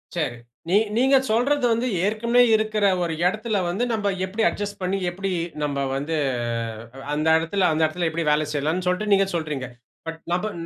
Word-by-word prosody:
சரி. 145 -8 -2 0.3
நீங் 210 +4 +3
நீங்க 265 +3 +4 0.2
சொல்றது 255 +4 +2
வந்து 230 +3 +1 0.2
ஏற்கனவே 235 +3 +2
இருக்கிற 215 -1 0 0.2
ஒரு 170 -1 -2
இடத்தில 215 +3 0
வந்து, 195 +7 -1
நம்ப 210 -2 -1 0.2
எப்பிடி 210 +4 -2
அட்ஜஸ்ட் 205 -1 -5
பண்ணி, 185 +2 0
எப்பிடி 195 +2 -4 0.3
நம்ப 140 -1 -1 0.2
வந்து 145 +4 -2 1.0
அந்த 155 +2 0
இடத்தில 180 +4 +1
அந்த 160 - 0
இடத்தில 170 +2 -1
எப்பிடி 165 +1 -3
வேலை 150 +1 +2
செய்யலாம்ன்னு 155 +5 -1
சொல்லிட்டு 205 +3 0
நீங்க 195 0 +4
சொல்றீங்க. 150 -6 -3 0.4
பட் 165 0 -5
நாப 195 +5 0
190 Hz, 165 wpm, -23 LUFS, 160-215 Hz, 1.0 s, நீங்க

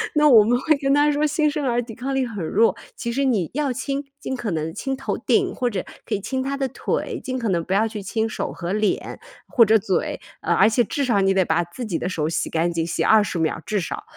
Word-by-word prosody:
那 300 0 +5
我 225 -6 +8
们 245 +3 +2
会 315 +2 +3
跟 275 -1 +1
她 290 +1 +4
说 295 +1 +1
新 305 0 +2
生 295 -1 -2
儿 240 -1 +1
抵 225 -2 -9
抗 270 +3 -4
力 265 -1 +1
很 205 -8 -5
弱， 225 +7 +3 0.2
其 235 - -4
实 275 +3 0
你 215 - +1
要 285 -2 0
亲 275 +3 -3 0.2
尽 265 - -4
可 230 -6 -3
能 160 0 -2
亲 270 -1 -3
头 270 - -3
顶， 385 -3 +1
或 250 -2 0
者 200 -5 -4 0.2
可 - - -4
以 205 - 0
亲 260 +7 -3
她 275 +1 -2
的 270 -1 0
腿， 255 - -3
尽 255 0 -3
可 230 - -2
能 170 -3 +1
不 185 - -9
要 220 +3 +3
去 210 -2 -6
亲 220 +3 -1
手 - - -3
和 175 +1 -4
脸 215 0 -1 0.3
或 250 -5 +5
者 220 +1 +4
嘴。 190 -1 -1 0.2
呃， - - +1
而 220 - +5
且 240 +2 +3
至 280 +2 -2
少 210 -5 +2
你 195 0 +3
得 190 -2 +2
把 175 - +1
自 175 +9 -7
己 185 -7 -2
的 180 - -3
手 155 -4 -1
洗 165 - -1
干 170 +1 0
净， 165 -1 -1
洗 170 - -2
20 210 -5 +3
秒 160 0 -1
至 210 - 0
少。 170 - -5
230 Hz, 280 characters per minute, -22 LUFS, 190-270 Hz, 0.3 s, 我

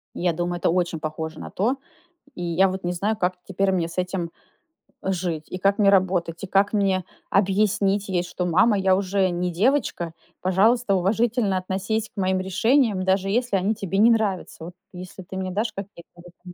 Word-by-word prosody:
Я 175 -1 0
думаю, 175 +1 -2
это - - +1
очень 175 -2 0
похоже 155 0 -5
на - - -7
то. 230 +8 0 0.6
И 175 - -7
я 175 +3 +3
вот 190 0 -4
не 175 - 0
знаю, 205 +5 -1
как 185 -3 0
теперь 195 0 0
мне 170 -3 0
с 170 - -10
этим 180 -2 -2 0.7
жить, 175 -4 -2
и 185 - -4
как 195 +2 +2
мне 205 -2 +5
работать, 185 -3 +1
и 195 - -3
как 195 +2 +2
мне 195 -3 +1 0.3
объяснить 200 0 +2
ей, 180 -2 0
что: 180 0 -4
"Мама, 195 +5 +4
я 190 -1 +3
уже 190 0 +1
не 180 0 -1
девочка, 185 - 0 0.3
пожалуйста, 200 +3 +3
уважительно 210 +1 +1
относись 195 +4 -2
к - - -47
моим 185 0 +1
решениям, 200 +3 +2
даже 190 +1 +1
если 235 -1 +1
они 200 +4 0
тебе 195 -1 -3
не 225 +3 +6
нравятся". 200 -7 -1
Вот 175 - -9 0.2
если 185 +1 -9
ты 190 - -10
мне 185 -1 -3
дашь 215 +3 -1
какие-то 195 -3 -9
в 175 - -18
этом. 180 0 -14
190 Hz, 190 wpm, -24 LUFS, 180-200 Hz, 0.7 s, не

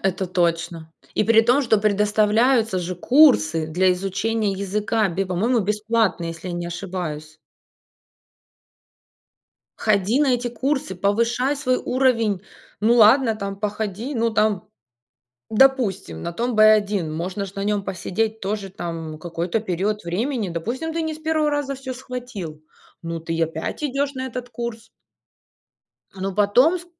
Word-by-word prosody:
Это 190 0 0
точно! 170 -2 -1 0.2
И - - +2
при 225 0 +6
том, 245 +5 +3
что 225 -4 +3
предоставляются 210 +2 +2
же 180 +1 -3
курсы 180 - +4
для 180 +4 +2
изучения 200 +3 -1
языка, 205 +2 0
бе 190 +3 -2
по-моему, 220 +7 +1
бесплатно, 210 -2 0
если 165 +2 -6
я 175 - -4
не 175 0 -4
ошибаюсь. 170 -4 -5 2.4
Ходи 215 +5 +2
на 290 - +3
эти 245 0 -2
курсы, 255 -3 -2
повышай 235 +8 +1
свой 255 -3 0
уровень. 230 -8 +1 0.4
Ну 225 +3 +4
ладно, 230 +1 +6
там 195 -1 -5
походи, 210 +5 -3
ну 230 -1 +1
там, 215 -4 0 0.8
допустим, 215 - +2
на 170 - -4
том 240 +6 -2
В1, 210 -5 +4
можно 185 +5 -3
ж 195 - -12
на 195 - -3
нем 205 -1 0
посидеть 220 +4 -2
тоже 200 0 -3
там 165 -4 -6
какой-то 170 +5 -2
период 205 +1 -2
времени. 215 +4 -2
Допустим, 235 - -3
ты 330 - -2
не 315 -1 -3
с - - -11
1 315 -1 +1
раза 290 -1 -1
всё 260 -1 -6
схватил, 245 - -7 0.4
ну, 165 0 -4
ты 165 0 -4
и 165 - 0
опять 160 - -3
идешь 280 0 -1
на 260 -1 -4
этот 250 -1 -6
курс. 235 -1 -6 1.3
Ну, 195 0 -4
потом 245 - +4
с 350 - -13
210 Hz, 145 wpm, -22 LUFS, 180-245 Hz, 2.4 s, при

